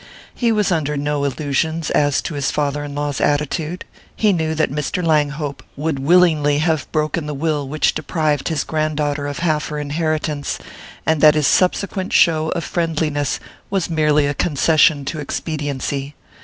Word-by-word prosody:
He 235 -2 +1
was 210 -3 +1
under 150 -3 0
no 145 0 -1
illusions 155 +3 -1
as 145 -1 +2
to 165 - -4
his 140 -2 -1
father 145 0 -1
in 145 -1 -6
law's 145 -1 -2
attitude: 150 +4 -1 0.3
he 210 -2 +3
knew 160 -2 -1
that 155 -3 +1
Mr. 150 +5 -2
Langhope 150 -2 0 0.2
would 150 -1 -1
willingly 155 -1 +4
have 155 -2 0
broken 155 +1 -1
the 150 - -4
will 150 -1 -1
which 150 +3 +1
deprived 155 -2 -1
his 160 -4 0
grand 155 -1 -1
daughter 145 -1 -1
of 145 - -4
half 155 -2 +1
her 150 - -5
inheritance, 150 0 -2 0.5
and 160 -2 +1
that 150 -1 +7
his 150 -2 +2
subsequent 185 +3 +1
show 160 -2 +4
of 170 - -2
friendliness 155 -4 -1 0.3
was 190 -4 -1
merely 150 -2 +3
a 145 - 0
concession 150 0 +3
to 155 +2 -4
expediency. 145 -2 -3
150 Hz, 165 wpm, -19 LUFS, 145-160 Hz, 0.5 s, that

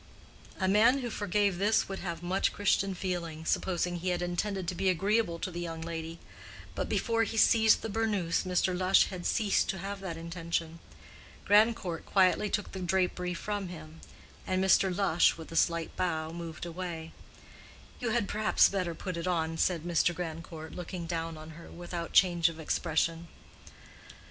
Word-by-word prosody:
A 190 - +1
man 230 +7 +4
who 240 -2 -4
forgave 205 -2 0
this 210 +3 +2
would 195 0 -5
have 170 -2 -5
much 185 +2 +1
Christian 195 -1 +1
feeling, 170 -4 -4
supposing 175 0 0
he 180 +2 -2
had 175 0 -1
intended 180 +1 -2
to 180 - -1
be 190 +2 +1
agreeable 195 0 +1
to 185 +2 -4
the 175 - -5
young 165 -1 -5
lady; 165 0 -5 0.6
but - - -3
before 230 -1 +1
he 225 0 -1
seized 220 0 +5
the - - -2
burnous 205 -6 0
Mr. 185 0 0
Lush 185 +1 +4
had 180 -2 -4
ceased 210 -4 +1
to 190 - -1
have 195 +2 -5
that 185 -4 -5
intention. 165 0 -4 0.7
Grandcourt 205 -5 +3
quietly 195 +2 +3
took 205 - -2
the 190 - -6
drapery 180 0 0
from 205 +1 -3
him, 160 -2 -10 0.5
and 185 0 +1
Mr. 190 0 +4
Lush, 180 -3 +3
with 160 0 -10
a - - -7
slight 170 0 +1
bow, 160 -3 -1
moved 165 -1 -7
away. 170 -2 -6 0.9
"You 245 - -2
had 225 -2 +1
perhaps 215 0 +3
better 180 -4 -2
put 180 +1 -5
it 170 +2 -3
on," 165 -2 0
said 170 -4 +1
Mr. 175 0 +1
Grandcourt, 160 -1 -6
looking 175 0 -6
down 165 -1 -3
on 155 +1 -10
her 165 +2 -12
without 175 -1 -6
change 175 -3 +4
of 165 -1 -10
expression. 165 +1 -1
180 Hz, 170 wpm, -30 LUFS, 165-195 Hz, 0.9 s, seized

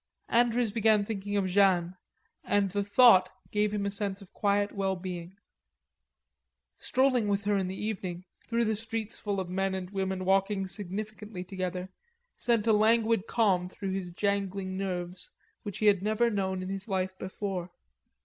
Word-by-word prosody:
Andrews 235 -1 +3
began 215 -1 +3
thinking 205 -1 -3
of 195 - +1
Jeanne 185 -2 +3 0.5
and 200 -2 +1
the 205 +1 0
thought 205 -3 +6 0.2
gave 210 0 +1
him 205 -1 -1
a 200 - -1
sense 200 -1 -1
of 195 -3 -15
quiet 205 0 +1
well 195 -1 -1
being. 180 0 -7 1.4
Strolling 255 -4 +2
with 200 0 0
her 205 0 +1
in 190 -2 0
the 190 - -4
evening 185 -4 -4 0.2
through 235 0 +1
the 220 0 +1
streets 225 0 -4
full 200 -2 -2
of 190 - -3
men 190 +1 -1
and 185 0 -5
women 190 -1 -2
walking 195 +1 +2
significantly 205 +1 -5
together 185 -1 -4 0.5
sent 230 -3 +1
a 225 - +4
languid 220 0 +3
calm 190 -6 +2
through 195 +1 -5
his 190 -2 -3
jangling 195 0 -1
nerves 180 -1 -3 0.3
which 205 -3 -6
he 215 - -1
had 200 -3 +5
never 220 +3 +2
known 190 -2 -1
in 185 - -5
his 195 +1 -4
life 190 -2 -1
before. 190 -2 -4
200 Hz, 165 wpm, -29 LUFS, 185-210 Hz, 1.4 s, thought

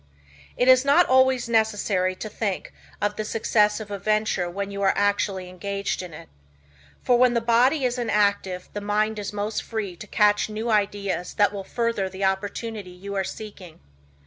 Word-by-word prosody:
It 245 - +2
is 255 0 +7
not 285 +6 +5
always 260 -1 +3
necessary 210 -5 +1
to 215 - -6
think 205 -2 -4 0.3
of 205 0 -1
the 215 - -2
success 210 -1 +1
of 210 -2 -8
a 200 - -4
venture 215 -3 0
when 200 +3 -4
you 200 0 -5
are 195 - +3
actually 200 -2 0
engaged 200 +2 -3
in 180 -2 -8
it. 150 - -11 0.8
For 245 -1 +3
when 250 -1 +4
the - - +4
body 245 +5 +3
is 250 0 -1
inactive 200 -5 0
the 205 - -4
mind 210 +1 0
is 205 - -4
most 210 +1 -2
free 210 -5 -4
to 210 - -10
catch 210 0 +2
new 220 +2 -3
ideas 200 -3 -1
that 205 0 +3
will 200 -1 -5
further 230 -2 -1
the 190 +1 -6
opportunity 205 +1 -3
you 185 +3 -8
are 195 -1 0
seeking. 195 -4 -9
210 Hz, 180 wpm, -24 LUFS, 195-225 Hz, 0.8 s, is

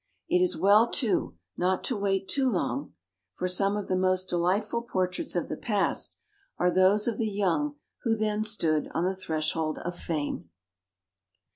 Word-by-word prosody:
It 360 +2 +3
is 365 - +2
well, 210 +4 +5
too, 220 - 0 0.2
not 185 +1 +1
to 250 - -1
wait 195 -1 0
too 270 -2 +2
long, 250 +6 -2 0.4
for 180 - -1
some 195 +3 +2
of 205 - -4
the 185 - +1
most 185 0 +1
delightful 195 +6 +1
portraits 185 -7 -2
of 175 - 0
the - - -3
past 205 -4 0 0.4
are 180 0 +2
those 190 +4 +4
of 230 -3 -1
the 220 -2 +1
young 205 - 0 0.3
who 230 -2 +1
then 215 0 0
stood 165 -9 0
on 170 - +1
the 190 +1 0
threshold 155 -3 -2
of 175 0 -5
fame. 150 - -3
195 Hz, 165 wpm, -28 LUFS, 180-215 Hz, 0.4 s, well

